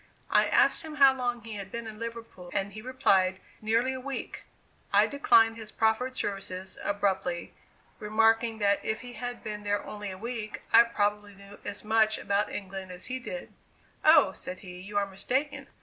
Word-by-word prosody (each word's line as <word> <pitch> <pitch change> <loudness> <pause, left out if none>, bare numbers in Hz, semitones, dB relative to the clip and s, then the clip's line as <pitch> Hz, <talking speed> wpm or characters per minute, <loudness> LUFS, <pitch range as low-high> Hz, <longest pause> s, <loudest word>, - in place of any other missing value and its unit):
I - - +5
asked - - +4
him 310 -1 -7
how 275 -2 +7
long 245 -3 -2
he 225 -1 -7
had 195 -1 -7
been 235 0 -5
in 215 -1 -8
Liverpool, 230 -6 -7
and 195 +1 -1
he 215 - -7
replied, 195 -7 +2 0.2
"Nearly 230 +4 +1
a 260 - -5
week." 275 +1 -6 0.5
I - - +6
declined 230 -5 +4
his 220 -1 -8
proffered 225 +4 +1
services 190 -3 -4
abruptly, 190 -4 -1 0.5
remarking 225 +1 +2
that 200 -1 +2
if 220 - -2
he 245 -1 -9
had 245 +2 -6
been 210 -1 -5
there 205 0 -1
only 210 -1 -6
a 185 - -7
week, 225 0 -5
I 230 - +10
probably 205 -2 -1
knew 200 +1 -14
as 205 0 -5
much 220 0 +3
about 200 +1 0
England 190 -1 -6
as 180 0 -7
he 260 - -2
did. - - -7 0.5
"Oh," 310 -11 +7
said 185 -1 -6
he, 180 -2 -9
"you 205 +2 -5
are 200 - +2
mistaken. 255 +9 -2
215 Hz, 180 wpm, -28 LUFS, 200-235 Hz, 0.5 s, I